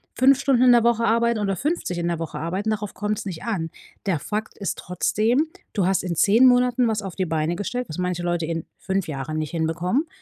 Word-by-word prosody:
5 265 +1 +5
Stunden 265 -4 +3
in 250 - +7
der 235 - +5
Woche 235 -1 +2
arbeiten 235 0 +2
oder 195 -2 0
50 280 - -2
in 170 0 -1
der 170 -1 -2
Woche 165 -2 -5
arbeiten, 185 +7 -2
darauf 210 -2 -3
kommt's 210 0 -3
nicht 180 -5 -6
an. 195 -9 -2 0.4
Der 185 -6 +1
Fakt 215 +7 -4
ist 200 -6 -3
trotzdem: 220 - +1 0.3
Du 195 -4 +1
hast 190 - +1
in 175 -2 -2
10 220 - +5
Monaten 250 -1 +4
was 215 -1 -1
auf 195 -4 -7
die 190 - -1
Beine 160 0 -1
gestellt, 245 +6 -3
was 155 - -6
manche 180 -1 -1
Leute 175 -1 0
in 165 0 -3
5 190 -1 -2
Jahren 150 +1 -4
nicht 155 -1 -3
hinbekommen. 175 - 0
195 Hz, 225 wpm, -23 LUFS, 170-235 Hz, 0.4 s, in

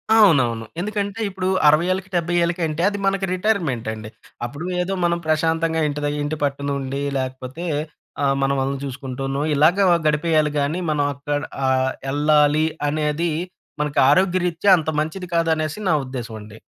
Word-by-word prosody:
అవునవును. 125 - +4
ఎందుకంటే 205 +1 -3
ఇప్పుడు 185 -1 -3 0.2
60 155 +3 +5
ఏళ్ళకి, 190 0 -3
70 175 0 0
ఏళ్ళకి 170 +1 -1
అంటే 155 +2 -3
అది 205 - -4
మనకి 195 0 +1
రిటైర్‌మెంట్ 175 - 0
అండి. 110 0 -8 0.4
అప్పుడు 145 +8 -6 0.2
ఏదో 190 +2 -2
మనం 170 0 +1
ప్రశాంతంగా 160 +1 +1
ఇంటి 145 0 -3
ద - - +1
ఇంటి 150 +1 -2
పట్టునుండి 140 -1 -2 0.2
లేకపోతే 130 +5 -5 0.6
ఆహ్, 135 0 +2
మన 135 0 +2
వాళ్ళని 135 +1 -1
చూసుకుంటూనో 135 0 -4
ఇలాగా 170 +7 +4 0.2
గడిపేయాలి 155 0 +2
గానీ 145 +5 -1
మనం 150 -1 +1
అక్కడ 145 +2 -3 0.3
ఆహ్, 130 0 +2 0.2
యెళ్ళాలి 150 +2 +3 0.2
అనేది 150 +3 0 0.5
మనకి 150 -1 0
ఆరోగ్యరీత్యా 180 +2 +2
అంత 160 -1 -2
మంచిది 175 +4 -3
కాదనేసి 160 0 0
నా - - +4
ఉద్దేశం 125 -3 -6
అండి. 105 +1 -12
155 Hz, 145 wpm, -21 LUFS, 140-170 Hz, 0.6 s, 60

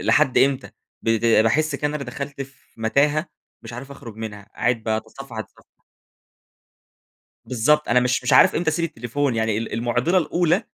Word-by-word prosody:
لحد 115 +4 +3
إمتى؟ 135 -1 +2 0.3
بت 115 0 +1
باحس 115 +7 +3
كده 150 - -1
إن 150 - -5
أنا 150 - -3
ب - - -14
دخلت 140 +3 -6
في 135 -3 -17
متاهة 145 +8 +2 0.4
مش 115 0 -9
عارف 130 +4 -8
أخرج 120 -6 -10
منها، 105 -3 -8
قاعد 120 -2 0
باتصفح، 110 +3 -5
أتصفح. 110 - -11 1.7
بالضبط 150 +5 +2
أنا 125 - +4
مش 125 0 +1
مش 125 - -1
عارف - - +7
إمتى 160 0 +1
أسيب 165 +2 -1
التليفون، 140 -2 -2
يعني 110 -2 0
ال 115 - -5
المعضلة 120 - +1
الأولى 175 +3 +1
125 Hz, 165 wpm, -22 LUFS, 115-145 Hz, 1.7 s, عارف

